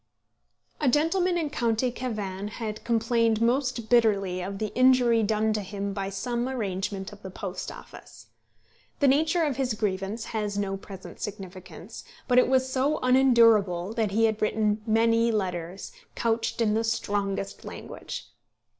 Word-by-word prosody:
A 290 Hz, -, +2 dB
gentleman 345 Hz, +6 st, +2 dB
in 310 Hz, -4 st, -2 dB
county 235 Hz, -1 st, 0 dB
Cavan 205 Hz, -6 st, -4 dB
had 215 Hz, 0 st, -6 dB
complained 230 Hz, -1 st, +2 dB
most 245 Hz, -1 st, 0 dB
bitterly 200 Hz, -6 st, +2 dB
of 195 Hz, +2 st, -5 dB
the 215 Hz, 0 st, -3 dB
injury 250 Hz, -2 st, +4 dB
done 215 Hz, +1 st, +1 dB
to 215 Hz, -, -1 dB
him 200 Hz, 0 st, -4 dB
by 195 Hz, -1 st, -3 dB
some 240 Hz, +5 st, -2 dB
arrangement 195 Hz, -5 st, -3 dB
of 205 Hz, -, -14 dB
the 190 Hz, -, -7 dB
Post 185 Hz, 0 st, -6 dB
Office. -, -, -13 dB, 0.7 s
The 285 Hz, -, +4 dB
nature 315 Hz, +5 st, +3 dB
of 285 Hz, -5 st, -1 dB
his 255 Hz, -5 st, 0 dB
grievance 205 Hz, +1 st, -2 dB
has 210 Hz, -2 st, -2 dB
no 195 Hz, -1 st, -1 dB
present 195 Hz, -1 st, -10 dB
significance; 190 Hz, -3 st, -8 dB, 0.2 s
but 250 Hz, -1 st, +5 dB
it -, -, +4 dB
was 260 Hz, 0 st, +3 dB
so 265 Hz, +3 st, +1 dB
unendurable 230 Hz, -8 st, +4 dB
that 225 Hz, -2 st, 0 dB
he 225 Hz, +3 st, +2 dB
had 220 Hz, -1 st, 0 dB
written 215 Hz, 0 st, +1 dB
many 230 Hz, +1 st, +3 dB
letters, 185 Hz, -3 st, -3 dB, 0.2 s
couched 230 Hz, 0 st, -1 dB
in 215 Hz, -2 st, +2 dB
the 225 Hz, +1 st, +1 dB
strongest 205 Hz, -3 st, -2 dB
language. -, -, -8 dB
220 Hz, 150 wpm, -27 LUFS, 200-245 Hz, 0.7 s, but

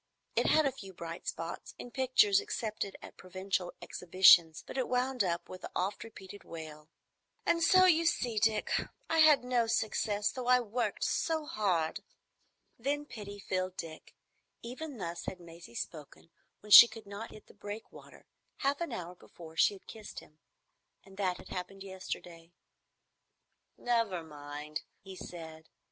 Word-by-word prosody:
It -, -, +2 dB
had 310 Hz, -1 st, +4 dB
a 275 Hz, -, +2 dB
few 195 Hz, -6 st, -11 dB
bright 170 Hz, -1 st, -8 dB
spots, 165 Hz, +1 st, -5 dB
in 245 Hz, -, -9 dB
pictures 275 Hz, -, +4 dB
accepted 220 Hz, -, -4 dB
at -, -, -11 dB
provincial 185 Hz, -1 st, -3 dB
exhibitions, 170 Hz, -2 st, +5 dB
but -, -, -9 dB
it 260 Hz, -2 st, 0 dB
wound 250 Hz, -1 st, +1 dB
up 170 Hz, -2 st, -2 dB
with 185 Hz, -, -9 dB
the -, -, -7 dB
oft 190 Hz, +3 st, -1 dB
repeated 205 Hz, -3 st, -11 dB
wail, 155 Hz, -2 st, -9 dB, 0.6 s
"And 335 Hz, -, +2 dB
so 370 Hz, +2 st, +6 dB
you 335 Hz, -2 st, +4 dB
see, 235 Hz, -8 st, 0 dB
Dick, 215 Hz, 0 st, +1 dB, 0.4 s
I 325 Hz, -, +3 dB
had 305 Hz, -4 st, +7 dB
no 245 Hz, -2 st, +1 dB
success, 215 Hz, -2 st, 0 dB
though 255 Hz, -2 st, -6 dB
I 250 Hz, 0 st, +6 dB
worked 240 Hz, +1 st, -2 dB
so 320 Hz, -2 st, 0 dB
hard." 180 Hz, -, 0 dB, 0.8 s
Then 290 Hz, +4 st, -1 dB
pity 205 Hz, -6 st, -8 dB
filled 185 Hz, -1 st, -3 dB
Dick. 160 Hz, -1 st, -8 dB, 0.5 s
Even 260 Hz, +4 st, -7 dB
thus 170 Hz, -3 st, -5 dB
had 185 Hz, -, -5 dB
Maisie 170 Hz, -7 st, -13 dB
spoken 155 Hz, +3 st, -7 dB, 0.3 s
when 210 Hz, -, -12 dB
she 235 Hz, -, +13 dB
could 225 Hz, -1 st, -11 dB
not 200 Hz, +3 st, -7 dB
hit 215 Hz, -, -13 dB
the -, -, -18 dB
breakwater, 205 Hz, +2 st, -10 dB, 0.3 s
half 280 Hz, +3 st, 0 dB
an 340 Hz, -, -2 dB
hour 175 Hz, 0 st, -5 dB
before 165 Hz, -2 st, -14 dB
she 200 Hz, -, +4 dB
had 195 Hz, -, -17 dB
kissed 215 Hz, -2 st, -9 dB
him. 155 Hz, +1 st, -19 dB, 0.6 s
And 195 Hz, -1 st, -16 dB
that 185 Hz, -3 st, 0 dB
had -, -, -13 dB
happened 190 Hz, +1 st, -6 dB
yesterday. 175 Hz, -3 st, -8 dB, 1.2 s
"Never 230 Hz, -8 st, 0 dB
mind," 150 Hz, 0 st, -7 dB, 0.2 s
he 190 Hz, 0 st, -9 dB
said. 160 Hz, -3 st, -9 dB
200 Hz, 155 wpm, -32 LUFS, 170-245 Hz, 1.2 s, she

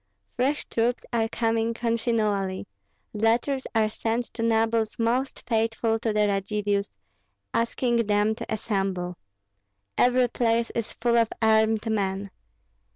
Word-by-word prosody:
Fresh 275 Hz, +4 st, 0 dB
troops 235 Hz, +2 st, -1 dB
are 225 Hz, -1 st, +2 dB
coming 225 Hz, 0 st, 0 dB
continually; 220 Hz, -5 st, 0 dB, 0.5 s
letters 235 Hz, +5 st, +1 dB
are 220 Hz, -1 st, +4 dB
sent 225 Hz, +2 st, -2 dB
to 230 Hz, -, -5 dB
nobles 225 Hz, -1 st, +1 dB
most 245 Hz, +4 st, -1 dB
faithful 225 Hz, 0 st, +1 dB
to 225 Hz, -1 st, -1 dB
the 210 Hz, 0 st, +2 dB
Radzivills, 200 Hz, 0 st, -1 dB, 0.6 s
asking 235 Hz, +1 st, +1 dB
them 210 Hz, +1 st, +2 dB
to 230 Hz, 0 st, -7 dB
assemble. 195 Hz, -4 st, -2 dB, 0.8 s
Every 250 Hz, 0 st, +4 dB
place 230 Hz, -1 st, +1 dB
is 230 Hz, -2 st, -3 dB
full 235 Hz, 0 st, +1 dB
of 230 Hz, -1 st, +2 dB
armed 220 Hz, 0 st, +3 dB
men. 200 Hz, -2 st, -1 dB
225 Hz, 120 wpm, -26 LUFS, 210-235 Hz, 0.8 s, are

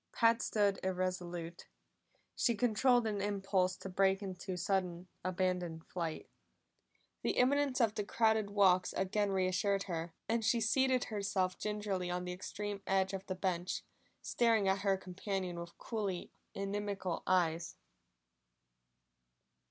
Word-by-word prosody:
Pat 230 Hz, 0 st, +4 dB
stood 205 Hz, -2 st, +1 dB
irresolute; 180 Hz, -2 st, -3 dB, 0.7 s
she 235 Hz, -, +2 dB
controlled 245 Hz, +2 st, +3 dB
an 210 Hz, -2 st, -1 dB
impulse 195 Hz, -2 st, +1 dB
to -, -, -7 dB
break 195 Hz, +1 st, +2 dB
into 185 Hz, -1 st, -5 dB
sudden, 180 Hz, -1 st, -1 dB, 0.2 s
abandoned 180 Hz, -3 st, -1 dB
flight. 165 Hz, -3 st, -4 dB, 0.9 s
The -, -, -1 dB
imminence 275 Hz, +1 st, +3 dB
of 225 Hz, -3 st, +3 dB
the 210 Hz, -, -2 dB
crowded 220 Hz, 0 st, +2 dB
walks 185 Hz, -3 st, +4 dB
again 200 Hz, +2 st, 0 dB
reassured 190 Hz, +1 st, +1 dB
her, 165 Hz, -2 st, -4 dB
and 225 Hz, +1 st, +1 dB
she 230 Hz, +3 st, +3 dB
seated 255 Hz, +3 st, +3 dB
herself 195 Hz, -3 st, -1 dB
gingerly 205 Hz, -4 st, -2 dB
on 180 Hz, 0 st, -2 dB
the 180 Hz, -, -3 dB
extreme 200 Hz, +2 st, -5 dB
edge 190 Hz, 0 st, +2 dB
of 195 Hz, 0 st, -5 dB
the 185 Hz, -, -2 dB
bench, 180 Hz, -1 st, -1 dB, 0.4 s
staring 225 Hz, -4 st, +2 dB
at 190 Hz, +1 st, +2 dB
her 195 Hz, -1 st, +2 dB
companion 185 Hz, -1 st, -4 dB
with 170 Hz, 0 st, -8 dB
coolly 200 Hz, -6 st, -3 dB, 0.2 s
inimical 195 Hz, -2 st, -2 dB
eyes. 170 Hz, -2 st, +1 dB
195 Hz, 130 wpm, -34 LUFS, 180-210 Hz, 0.9 s, Pat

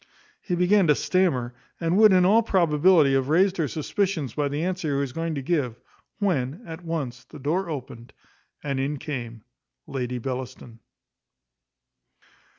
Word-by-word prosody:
He 180 Hz, -, -2 dB
began 180 Hz, +1 st, +3 dB
to 150 Hz, -, +5 dB
stammer, 135 Hz, -12 st, 0 dB, 0.3 s
and 165 Hz, +1 st, 0 dB
would, 215 Hz, 0 st, +7 dB
in 185 Hz, -1 st, +5 dB
all 215 Hz, +5 st, +5 dB
probability, 170 Hz, -6 st, +3 dB
have 135 Hz, 0 st, +1 dB
raised 185 Hz, +4 st, +3 dB
her 160 Hz, -4 st, 0 dB
suspicions 155 Hz, -, -2 dB
by 145 Hz, -1 st, 0 dB
the 145 Hz, +3 st, -2 dB
answer 175 Hz, -5 st, -1 dB
he -, -, +1 dB
was 140 Hz, -3 st, -3 dB
going 165 Hz, -1 st, -3 dB
to 140 Hz, -, -4 dB
give, 130 Hz, -7 st, -1 dB, 0.4 s
when, 170 Hz, -, -1 dB
at 165 Hz, +2 st, -9 dB
once, 145 Hz, -7 st, -4 dB
the 155 Hz, -, -12 dB
door 165 Hz, +6 st, -1 dB
opened, 125 Hz, -5 st, -7 dB, 0.5 s
and 140 Hz, -2 st, -2 dB
in 140 Hz, +2 st, -1 dB
came 120 Hz, -6 st, -6 dB, 0.4 s
Lady 125 Hz, -2 st, -4 dB
Bellaston. 125 Hz, -2 st, -6 dB
150 Hz, 155 wpm, -25 LUFS, 130-180 Hz, 0.5 s, would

